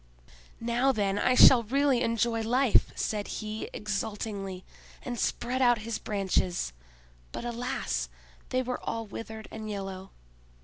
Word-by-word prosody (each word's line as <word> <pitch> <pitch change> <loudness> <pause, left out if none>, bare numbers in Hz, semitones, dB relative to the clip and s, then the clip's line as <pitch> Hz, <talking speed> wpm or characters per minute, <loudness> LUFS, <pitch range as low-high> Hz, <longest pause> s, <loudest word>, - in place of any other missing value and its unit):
"Now, 240 +3 +2
then, 205 -4 0
I 255 - +3
shall 250 -1 +9
really 265 +2 +2
enjoy 230 -1 +1
life," 245 +2 +3
said 210 -1 -2
he, 215 0 -4
exultingly, 205 -2 -4 0.4
and 240 -2 -4
spread 255 +2 -1
out 240 -2 +5
his 230 -1 -3
branches; 190 - 0 0.6
but, - - -5
alas! 245 +3 -2 0.4
they 255 0 +1
were 250 0 -3
all 225 0 -3
withered 220 +1 -8
and 220 -1 -6
yellow. 195 -2 -5
225 Hz, 130 wpm, -29 LUFS, 205-245 Hz, 0.6 s, shall